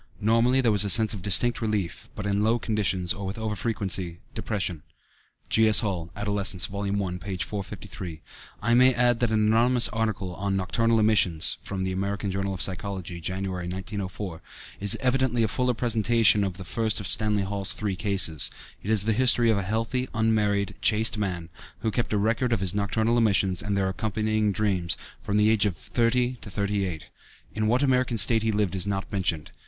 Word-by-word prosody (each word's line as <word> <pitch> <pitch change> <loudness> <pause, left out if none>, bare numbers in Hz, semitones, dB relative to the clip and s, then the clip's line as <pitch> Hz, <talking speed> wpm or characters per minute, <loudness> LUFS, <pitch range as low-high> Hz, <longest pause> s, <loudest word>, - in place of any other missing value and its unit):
Normally 115 +5 +2
there 120 -3 +2
was 105 -1 +4
a 100 - -1
sense 110 +3 +5
of 100 - -7
distinct 110 +6 +2
relief, 105 -6 -3
but 105 - -6
in 100 0 0
low 115 +2 +2
conditions, 95 -6 0
or 100 - -8
with 95 +3 -5
over 110 -1 -3
frequency, 95 -5 -1 0.2
depression. 95 -7 -3 0.7
(G.S. 110 -1 +6
Hall, 90 -7 -3
Adolescence, 100 -3 0
vol. 100 +1 -5
i, 100 -3 -2
p. 95 +2 -6
453.) 95 -4 -6 0.4
I 120 +2 +2
may 130 +1 +5
add 120 -1 +2
that 120 - +1
an 110 -1 +1
anonymous 120 +3 +3
article 110 -5 -3
on 100 +2 -2
"Nocturnal 115 +4 +1
Emissions" 105 -7 +2
(American 95 +1 -3
Journal 95 +1 -2
of 90 - +2
Psychology, 95 -2 -3
Jan., 95 +4 -3
1904) 95 0 -5 0.4
is 100 0 +1
evidently 130 -2 +1
a - - +2
fuller 125 +3 -1
presentation 115 -2 +3
of 95 -3 -4
the 95 - -9
first 110 +4 0
of 100 - -6
Stanley 105 +1 +2
Hall's 100 0 -1
three 100 -3 -3
cases. 95 - +1 0.3
It 100 - -7
is 110 -3 +4
the 110 +1 +1
history 120 -1 +3
of 105 - +1
a - - -2
healthy, 115 +6 -2
unmarried, 105 -3 0
chaste 110 0 +3
man, 90 -5 -3 0.3
who 110 0 -1
kept 120 +2 -2
a 105 - +1
record 115 +4 0
of 115 - 0
his 95 -2 +1
nocturnal 110 +3 0
emissions 95 -4 +2
(and 100 -1 -2
their 95 -1 0
accompanying 110 +1 -1
dreams) 95 -5 0 0.2
from 105 - -2
the 105 +1 +4
age 110 -1 +3
of 90 -5 -4
thirty 125 +4 0
to - - -9
thirty 100 0 -2
eight. 80 -5 -7 0.4
In 110 0 -1
what 125 +5 +2
American 130 -3 +1
State 110 +3 +5
he 110 0 0
lived 105 -3 -1
is 95 0 -2
not 95 -1 -3
mentioned. 85 -6 -2
105 Hz, 185 wpm, -25 LUFS, 95-110 Hz, 0.7 s, G.S